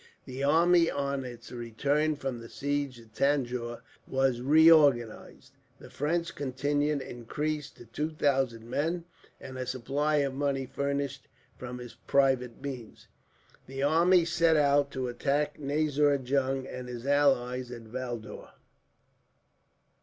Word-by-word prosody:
The 130 +2 -5
army, 165 +3 +4
on 140 -1 -2
its 120 -2 -9
return 140 +6 0
from 135 -4 -4
the 115 0 -11
siege 140 -2 -2
of 115 -1 -17
Tanjore, 125 -3 -1 0.3
was 130 -2 +1
reorganized; 145 -5 +4 0.2
the - - -14
French 165 +4 -1
contingent 145 +1 -1
increased 150 +5 -4
to 120 - -13
two 150 +7 -3
thousand 135 -7 0
men; 165 +7 -1 0.3
and 130 -1 -8
a 130 - -3
supply 135 +5 -1
of 140 -2 +1
money 135 -1 -1
furnished, 140 0 -3 0.3
from 125 0 -7
his 120 -2 -9
private 130 0 +1
means. 130 -5 -8 0.6
"The 135 +1 -4
army 170 +4 +4
set 165 -1 +3
out 145 -1 +3
to 130 -1 -2
attack 140 +5 -1
Nazir 145 0 +2
Jung 135 0 -1
and 125 -1 -7
his 120 0 -7
ally 135 -3 +2
at 125 -2 -8
Valdaur. 120 -1 -7
135 Hz, 130 wpm, -29 LUFS, 125-145 Hz, 0.6 s, army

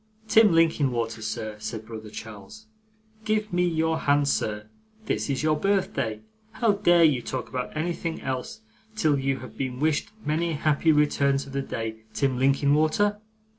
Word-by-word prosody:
'Tim 220 -3 +6
Linkinwater, 130 -9 +1
sir,' 110 -1 -4
said 110 +1 -6
brother 110 -1 -8
Charles; 110 - -10 0.6
'give 215 -1 -1
me 180 0 +2
your 160 -1 0
hand, 145 0 +2
sir. 105 -6 -1 0.4
This - - -1
is 140 +1 -1
your 155 0 +3
birthday. 150 - -1 0.3
How 220 0 +2
dare 175 -4 +4
you 145 -6 +4
talk 130 +2 -4
about 125 +3 -4
anything 165 0 -2
else 130 - -4 0.3
till 155 -9 +2
you 135 0 0
have 130 - -11
been 130 -2 -3
wished 155 0 +1 0.2
many 165 +2 0
happy 155 +1 +2
returns 140 -2 +2
of 135 - -11
the 140 - -1
day, 115 -4 -4 0.2
Tim 135 -3 0
Linkinwater? 155 +10 +2
145 Hz, 155 wpm, -26 LUFS, 125-165 Hz, 0.6 s, Tim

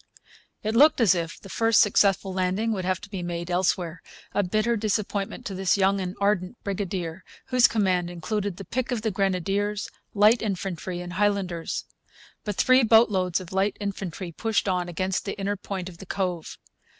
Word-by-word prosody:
It 215 +1 -1
looked 295 +5 +6
as 220 -6 +5
if 170 -1 -3
the - - -12
first 220 +5 +3
successful 195 -2 +3
landing 190 +4 0
would 190 -4 -2
have 185 0 0
to 205 - -11
be 190 -3 -4
made 175 0 -4
elsewhere, 175 -2 0 0.3
a - - +2
bitter 215 +5 +1
disappointment 210 -1 -2
to 195 - -4
this 190 0 +1
young 195 0 +2
and 185 +1 -4
ardent 200 +1 0
brigadier, 185 -3 -3 0.3
whose 250 -1 +6
command 185 -5 +1
included 195 +2 -3
the 195 - -8
pick 255 +7 -2
of 230 -3 -2
the 220 - 0
grenadiers, 195 +2 -1 0.2
light 210 +3 +5
infantry, 185 -3 -3
and 175 0 -7
Highlanders. 190 -4 -1 0.6
But 210 -2 -3
three 255 +4 +5
boatloads 210 -6 +4
of 185 0 -10
light 195 +2 +1
infantry 190 -3 -4
pushed 220 +4 -1
on 180 -2 0
against 185 +2 -1
the 200 - -4
inner 200 +1 -1
point 190 -2 -5
of 175 -2 -11
the 195 - -10
cove. 180 -4 -3
195 Hz, 175 wpm, -26 LUFS, 180-210 Hz, 0.6 s, looked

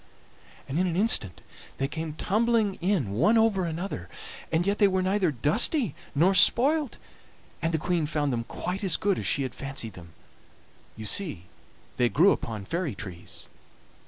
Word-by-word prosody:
"And 145 +5 -2
in 185 - +2
an 170 - -2
instant 180 - +1 0.4
they 135 - 0
came 160 +1 -5
tumbling 220 +4 +1
in 175 - 0
one 170 - +3
over 215 -5 +3
another, 165 - -5 0.4
and 165 +2 +1
yet 200 +1 0
they 205 - +6
were 190 -1 0
neither 190 -1 +2
dusty 165 - +1 0.2
nor 175 +7 +4
spoilt, 270 - +4 0.6
and 165 - 0
the 160 - +1
Queen 165 0 0
found 145 -3 -1
them 115 -1 -2
quite 185 - -4
as 180 -5 +2
good 200 -2 0
as - - -3
she 140 - +1
had 130 - -4
fancied 135 -6 -6
them. 85 -3 -13 0.8
You 110 - -7
see 135 - 0 0.5
they 120 -1 +3
grew 175 +11 +5
upon 110 -4 -3
fairy 165 - -2
trees. 95 -5 -9
165 Hz, 165 wpm, -27 LUFS, 135-200 Hz, 0.8 s, they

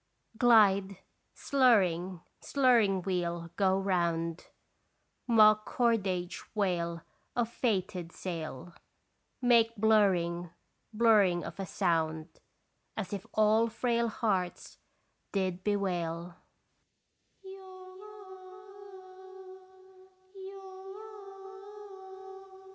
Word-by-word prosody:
Glide, 200 -5 +4 0.4
slurring, 190 - +2 0.2
slurring 230 -9 +2
wheel, 170 -3 -3
go 190 -1 +2
round, 170 -3 -1 0.8
Mock 215 -2 +5
cordage 195 -7 -1
wail 170 -5 -1 0.3
of 235 -2 0
fated 185 -8 -2
sail 165 -3 -7 0.7
Make 230 -2 +4
blurring, 190 -6 +2 0.4
blurring 210 -6 +3
of - - -9
a 195 - -4
sound 160 -3 -2 0.6
As 205 -3 -4
if 195 -2 -6
all 215 +1 +3
frail 235 +1 -1
hearts 195 -6 -3 0.5
did 185 -2 -2
bewail. 175 -4 -2
190 Hz, 65 wpm, -30 LUFS, 175-220 Hz, 0.8 s, Mock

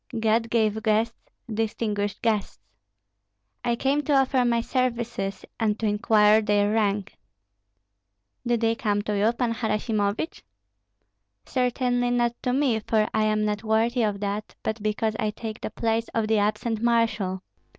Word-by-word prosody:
"God 225 +1 +1
gave 220 -2 +1
guests, 220 +1 0 0.2
distinguished 210 -2 -2
guests. 215 - 0 1.0
I 240 -1 +1
came 275 +4 +1
to 295 - +2
offer 265 -1 +3
my 235 -1 +2
services 235 -5 -2
and 215 -2 +1
to 225 - -3
inquire 210 0 +4
their 205 0 +2
rank." 205 -2 -1 1.2
"Did 240 -1 0
they 225 0 +3
come 210 -4 -1
to 210 0 -2
you, 210 +3 +3
Pan 235 -1 -1
Harasimovich?" 210 -5 -1 1.0
"Certainly 245 -1 0
not 240 -1 +1
to 250 - 0
me, 255 -4 +2
for 215 0 +1
I 215 - +2
am 215 0 +1
not 210 0 -2
worthy 225 +3 +1
of 210 -2 -1
that; 205 +1 -3
but 220 0 -2
because 215 +1 -1
I 215 - +1
take 220 +1 -6
the - - -3
place 225 0 -1
of 225 -1 +1
the 220 -1 +3
absent 215 +2 -1
marshal. 225 -5 +1
220 Hz, 150 wpm, -25 LUFS, 210-235 Hz, 1.2 s, inquire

